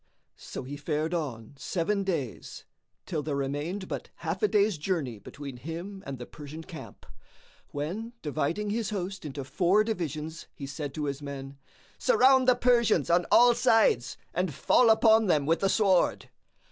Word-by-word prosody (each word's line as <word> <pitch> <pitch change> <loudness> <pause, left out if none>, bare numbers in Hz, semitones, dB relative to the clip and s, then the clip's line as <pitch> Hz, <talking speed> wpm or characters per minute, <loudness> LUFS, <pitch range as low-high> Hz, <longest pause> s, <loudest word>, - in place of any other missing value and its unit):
So - - -7
he 140 +3 -7
fared 155 +2 -2
on 135 -9 -4
seven 195 +6 -1
days, 155 - -4 0.4
till 160 -5 -2
there 150 -1 -3
remained 145 +8 -3
but - - -5
half - - -4
a 425 - +4
day's 205 - +2
journey 150 - -2
between 140 +3 -9
him 170 +9 -7
and 135 -1 -5
the 120 - -7
Persian 150 +3 -9
camp; 165 -2 -11 0.6
when, 185 +12 -4
dividing 165 +8 -1
his 220 -2 -1
host 190 -3 -4
into 140 -1 -5
four 185 +9 +2
divisions 160 -6 -4
he 140 - -7
said 140 0 -6
to 150 - -2
his 140 0 -3
men, 140 -1 -7 0.4
"Surround 265 - +5
the 255 - +6
Persians 235 - +3
on 175 0 +3
all 240 0 +7
sides 225 - +3 0.2
and 180 -4 -1
fall 240 - +4
upon 220 -1 +5
them 150 -5 +2
with 165 +3 +2
the 195 - +1
sword." 190 -4 +2
165 Hz, 160 wpm, -28 LUFS, 145-205 Hz, 0.6 s, all